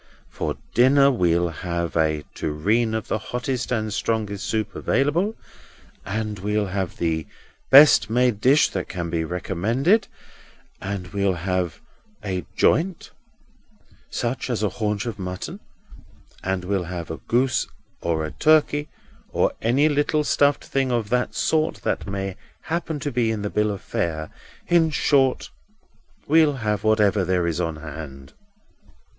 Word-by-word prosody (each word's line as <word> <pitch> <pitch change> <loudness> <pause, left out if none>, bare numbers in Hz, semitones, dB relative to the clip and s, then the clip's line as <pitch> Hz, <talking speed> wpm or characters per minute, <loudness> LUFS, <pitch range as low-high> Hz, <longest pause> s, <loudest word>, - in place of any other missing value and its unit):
For - - -3 0.2
dinner 135 +3 +5
we'll 85 -7 +2
have 85 0 -4
a 80 -2 +1
tureen 110 +10 0
of 110 - -3
the 110 - -1
hottest 125 +3 -3
and 110 -3 -1
strongest 105 -3 -2
soup 110 -2 -1
available, 165 - +1 0.7
and 105 0 -3
we'll 105 +2 0
have 95 -2 -3
the 80 -2 -1 0.4
best 135 -5 +8
made 120 -2 +2
dish 140 +6 +5
that 95 - -4
can 85 -2 -4
be 80 -1 0
recommended, 105 - +1 0.7
and 95 -2 -4
we'll 100 -2 0
have 90 -3 -1 0.4
a 95 -3 -3
joint 175 +2 +1 1.0
(such 125 +2 -3
as 115 -3 -1
a 105 - +2
haunch 105 -1 -2
of 115 -3 -5
mutton), 90 -1 -5 0.8
and 95 -1 -2
we'll 95 -2 -1
have 85 -1 -5
a 80 - -5
goose, 125 +1 +1 0.3
or 80 -2 -1
a 80 - -5
turkey, 150 -1 +3 0.4
or - - +2
any 130 +7 +3
little 150 +1 +1
stuffed 145 -1 +2
thing 135 -1 0
of 115 -4 -1
that 125 0 0
sort 155 0 +1
that - - -1
may 95 -1 -3 0.3
happen 160 -2 -3
to 145 - -2
be 120 -2 +1
in 110 -2 -2
the 105 - -3
bill 105 0 +1
of 100 -2 -4
fare—in 85 - -1
short, 135 -3 +2 0.8
we'll 155 -1 +5
have 105 -5 -2
whatever 105 -2 +3
there 90 -1 +1
is 85 +1 -1
on 80 -2 -2
hand." 75 -3 -9
105 Hz, 140 wpm, -23 LUFS, 90-130 Hz, 1.0 s, best